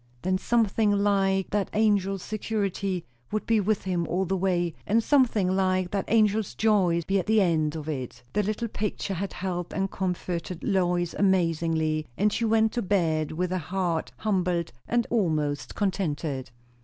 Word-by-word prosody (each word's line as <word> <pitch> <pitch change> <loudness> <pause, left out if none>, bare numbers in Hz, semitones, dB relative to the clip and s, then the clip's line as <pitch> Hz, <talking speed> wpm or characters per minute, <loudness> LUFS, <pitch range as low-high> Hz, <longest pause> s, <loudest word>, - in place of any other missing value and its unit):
Then 185 +1 +1
something 225 -1 +2
like 195 -1 +2
that 205 -1 0
angel's 200 -3 +2
security 200 -4 -2 0.3
would 215 - -2
be 225 -1 +3
with 210 0 0
him 175 -3 -1
all 190 +2 0
the 190 +2 -1
way, 175 -3 0
and 225 +3 +3
something 225 -9 +3
like 185 -1 +1
that 200 -1 -2
angel's 215 -2 +2
joy 190 -6 +2
be 195 +3 +1
at 180 - -4
the 220 0 +4
end 160 -5 +2
of 155 -1 -6
it. 130 -4 -5
The 210 - +2
little 215 +3 -2
picture 210 -2 -3
had 195 +2 -4
helped 180 -2 -4
and 195 0 -1
comforted 180 -2 -3
Lois 175 -2 +1
amazingly, 165 -4 +1
and 205 +1 +2
she 230 - 0
went 220 0 +3
to 240 - -1
bed 160 -6 0
with 180 +2 -1
a 185 - 0
heart 175 0 -2
humbled 180 -5 0 0.2
and 240 0 +1
almost 155 -10 0
contented. 160 -9 -2
190 Hz, 165 wpm, -26 LUFS, 170-205 Hz, 0.3 s, the